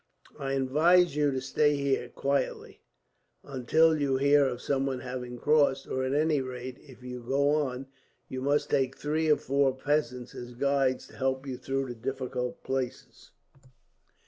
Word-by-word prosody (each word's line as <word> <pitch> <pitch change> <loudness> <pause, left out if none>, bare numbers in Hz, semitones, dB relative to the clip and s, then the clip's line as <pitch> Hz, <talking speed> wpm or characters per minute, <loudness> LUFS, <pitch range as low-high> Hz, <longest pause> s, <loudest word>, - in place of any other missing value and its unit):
I 135 -1 -2
advise 155 +5 +3
you 150 -1 +2
to 130 -1 -1
stay 145 +2 +2
here 140 -3 0
quietly, 140 +1 -2 0.6
until 155 +5 +3
you 135 -2 +1
hear 140 +1 +4
of 125 -2 -3
someone 135 -2 -1
having 125 -1 -6
crossed; 140 -1 +2
or 130 - -2
at 130 +2 -1
any 150 -1 +2
rate, 130 0 -7
if 130 -3 -16
you 125 0 -6
do 120 - -16
go 140 +2 +2
on, 135 -3 -1 0.4
you 130 0 -5
must 145 +2 +1
take 135 -1 +1
three 155 +2 0
or 150 - +5
four 135 -1 +1
peasants 130 -3 -1
as 120 0 -9
guides, 135 0 +1
and - - -16
to - - -15
help 130 0 0
you 130 -2 -4
through 135 0 -3
difficult 125 +1 -4
places." 130 -2 -4
135 Hz, 165 wpm, -29 LUFS, 130-145 Hz, 0.6 s, or